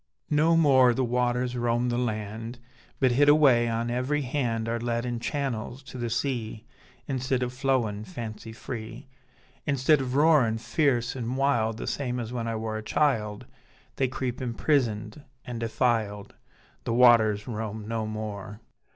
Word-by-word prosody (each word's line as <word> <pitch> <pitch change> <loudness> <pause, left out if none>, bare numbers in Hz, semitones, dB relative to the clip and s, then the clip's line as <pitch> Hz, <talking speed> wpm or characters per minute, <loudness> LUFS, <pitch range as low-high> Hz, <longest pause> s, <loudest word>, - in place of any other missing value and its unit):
No 160 +3 +4
more 130 -6 +5
the 130 - +1
waters 125 +1 0
roam 120 0 0
the 120 - -1
land, 110 0 -4 0.4
But 130 -2 +3
hid 145 +4 +4
away 135 -6 +5
on 115 +1 -1
every 135 +4 0
hand 120 -4 -1
Are 115 +1 -1
led 120 0 -2
in 120 -1 -3
channels 130 -1 -3
to 130 -1 -9
the 120 -1 -2
sea, 115 -3 -3 0.4
Instead 130 -1 -1
of 125 0 -3
flowin' 125 -6 0
fancy 110 +2 -7
free, 115 +3 -7 0.6
Instead 140 +1 +3
of 130 -1 -3
roarin' 145 -7 +4
fierce 125 0 0
an' 125 0 -3
wild 120 -5 +1
The - - -5
same 125 -3 -2
as 120 0 -5
when 115 -2 -3
I 115 - -2
wor 110 0 -3
a - - -8
child, 110 -4 0 0.5
They 135 - +2
creep 130 0 -4
imprisoned 115 0 -1 0.2
an' 120 -2 -5
defiled: 110 -3 -1 0.5
The 115 - -1
waters 110 -4 +5
roam 110 -2 -5
no 110 -1 -2
more. 105 -1 -6
120 Hz, 155 wpm, -27 LUFS, 110-130 Hz, 0.6 s, more